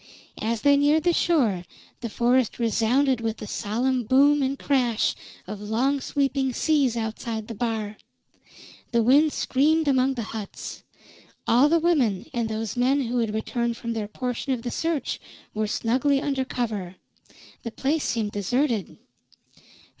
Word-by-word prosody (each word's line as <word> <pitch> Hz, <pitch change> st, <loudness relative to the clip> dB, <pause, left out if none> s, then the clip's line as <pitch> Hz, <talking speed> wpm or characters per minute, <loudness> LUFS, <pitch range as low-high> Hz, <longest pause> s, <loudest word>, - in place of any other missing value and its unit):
As 225 Hz, +1 st, -1 dB
they 285 Hz, -1 st, +5 dB
neared 295 Hz, +2 st, +3 dB
the 350 Hz, 0 st, +3 dB
shore, 245 Hz, -, +2 dB, 0.4 s
the 235 Hz, -, -4 dB
forest 240 Hz, +2 st, +1 dB
resounded 240 Hz, +3 st, +2 dB
with 225 Hz, -1 st, -2 dB
the -, -, -7 dB
solemn 240 Hz, +5 st, -1 dB
boom 280 Hz, +5 st, +4 dB
and 270 Hz, +1 st, 0 dB
crash 250 Hz, -6 st, +1 dB, 0.3 s
of 205 Hz, +2 st, -7 dB
long 250 Hz, +7 st, 0 dB
sweeping 275 Hz, -1 st, 0 dB
seas 275 Hz, -5 st, +2 dB
outside 220 Hz, 0 st, -4 dB
the 230 Hz, -, -6 dB
bar; 220 Hz, -2 st, -3 dB, 0.9 s
the 235 Hz, -2 st, +3 dB
wind 290 Hz, +6 st, +5 dB
screamed 310 Hz, +5 st, +1 dB
among 265 Hz, -1 st, +2 dB
the 235 Hz, -, -3 dB
huts; 215 Hz, -3 st, -7 dB, 0.7 s
all 255 Hz, +6 st, +5 dB
the 335 Hz, -, +4 dB
women 285 Hz, -, +1 dB
and 235 Hz, -2 st, -1 dB
those 220 Hz, -1 st, -3 dB
men 260 Hz, +3 st, +2 dB
who 245 Hz, -1 st, -1 dB
had 225 Hz, -2 st, 0 dB
returned 235 Hz, +1 st, -2 dB
from 235 Hz, -1 st, -4 dB
their 215 Hz, -2 st, -3 dB
portion 250 Hz, +4 st, -3 dB
of 235 Hz, -3 st, -4 dB
the 240 Hz, -, -3 dB
search 330 Hz, -3 st, -2 dB, 0.3 s
were 215 Hz, 0 st, -1 dB
snugly 255 Hz, +6 st, +1 dB
under 275 Hz, -2 st, -1 dB
cover. 210 Hz, -8 st, -3 dB, 0.7 s
The 230 Hz, -, -5 dB
place 290 Hz, +6 st, -1 dB
seemed 220 Hz, -3 st, -1 dB
deserted. 225 Hz, -, -1 dB
245 Hz, 150 wpm, -25 LUFS, 220-275 Hz, 0.9 s, they